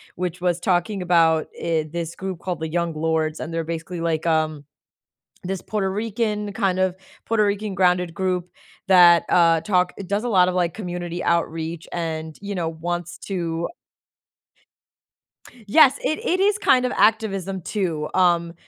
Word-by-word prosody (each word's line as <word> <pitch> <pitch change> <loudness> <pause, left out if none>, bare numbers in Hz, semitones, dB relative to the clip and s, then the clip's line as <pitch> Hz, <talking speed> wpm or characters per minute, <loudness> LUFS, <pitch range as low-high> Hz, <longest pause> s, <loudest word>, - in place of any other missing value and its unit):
which 180 0 -3
was 175 -1 0
talking 185 +2 0
about, 165 -3 +3
eh, 165 -2 0
this 170 -1 -4
group 190 -3 -5
called 180 -2 -4
the 160 - -3
Young 170 0 -1
Lords, 160 0 -1
and 160 - -5
they're 165 0 -2
basically, 165 +1 -5
like, 165 -1 -1
um, 155 -2 0 0.8
this 190 0 -3
Puerto 200 -3 -2
Rican, 210 0 -2
kind 195 -3 0
of 185 -1 +1 0.3
Puerto 220 -2 +2
Rican 205 0 -2
grounded 180 -2 +2
group 180 -1 -1 0.4
that, 175 -2 +7
uh, 165 -2 +4
talk 180 0 +1
it 195 - -8
does 205 +3 -1
a - - -1
lot 185 -4 +4
of, 180 - -1
like, 175 -2 0
community 175 -3 -5
outreach 165 -1 -1
and, 160 -2 -4
you 200 0 -5
know, 165 -2 -1
wants 170 +1 -4
to 170 -3 -3 2.0
Yes, 275 +3 +6
it, 310 - 0
it 365 +2 +1
is, 410 +2 +3
kind 255 -8 +3
of, 250 - -1
activism 195 -4 +1
too, 165 -6 -2
um, 170 -2 +2
175 Hz, 160 wpm, -22 LUFS, 165-195 Hz, 2.0 s, that